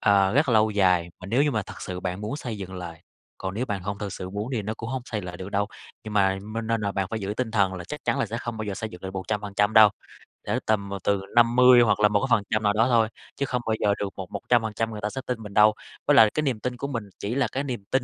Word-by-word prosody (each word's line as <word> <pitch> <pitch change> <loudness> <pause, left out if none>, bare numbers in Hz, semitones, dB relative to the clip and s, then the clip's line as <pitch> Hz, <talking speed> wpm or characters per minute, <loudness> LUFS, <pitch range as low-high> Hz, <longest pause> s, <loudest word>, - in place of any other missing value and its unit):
ờ, 100 -1 +4
rất 145 +1 +3
là - - +3
lâu 110 0 +4
dài, 90 -4 +2
mà 90 - -8
nếu 120 +8 +2
như 150 - +2
mà 110 -6 -1
thật - - -11
sự 90 -1 -5
bạn 90 +1 -3
muốn 105 +7 -3
xây 120 -8 -5
dựng 95 -1 -7
lại, 85 -2 -7 0.4
còn 95 0 -4
nếu 120 +5 -2
bạn 100 -5 -3
hông 100 +1 -4
thực 100 -2 -4
sự 95 -1 -6
muốn 105 +4 -4
thì 115 -4 -1
nó 110 +2 -3
cũng 115 - -6
hông 130 0 -3
xây 110 -4 -4
lại 90 0 -7
được 95 +2 -7
đâu. 100 0 +1 0.4
Nhưng 110 - -6
mà 95 -1 +3
minh 110 +2 -5
nên 115 0 0
là 100 -1 -1
bạn 95 -1 -1
phải 110 - -3
giữ 100 +1 -3
tinh 125 -3 -1
thần 100 -4 +2
là 90 -1 -6
chắc 150 +7 -7
chắn - - +1
là 135 - +1
sẽ 115 +2 -4
không 120 -1 -5
bao 110 - -4
giờ 100 -2 -3
xây 110 +2 -4
dựng 90 -2 -12
lại 95 - -5
100% 105 +2 -1
đâu, 110 -1 +9 0.5
cỡ - - -1
tầm, 100 -2 0
ờ, 100 0 -4
từ 100 -1 +1
50 120 +1 +7
hoặc 115 -3 +3
là 105 - +6
một 105 -1 +1
cái 135 - 0
phần 105 - -6
trăm 110 0 0
nào 105 -1 +3
đó 115 +3 +3
thôi, 115 -3 +3 0.3
chứ 140 - 0
không 125 -2 -2
bao 110 - +2
giờ 100 - +3
được 100 - -2
một 95 -2 -7
một - - -4
trăm 120 -1 +5
phần 110 -1 -4
trăm 115 +1 -1
người 105 -1 -6
ta 105 - -1
sẽ 130 - -5
tin 120 -3 -3
mình 105 -1 -9
đâu. 105 +1 +6 0.3
Với - - +5
lại 110 - +8
cái 155 - 0
niềm 130 -7 -1
tin 125 +2 -3
của 140 - -3
mình 120 -6 -3 0.2
chỉ 105 +4 -3
là 140 -1 +2
cái 135 - -2
niềm 125 -7 -4
tin 130 -1 +2
105 Hz, 320 wpm, -25 LUFS, 100-115 Hz, 0.5 s, đâu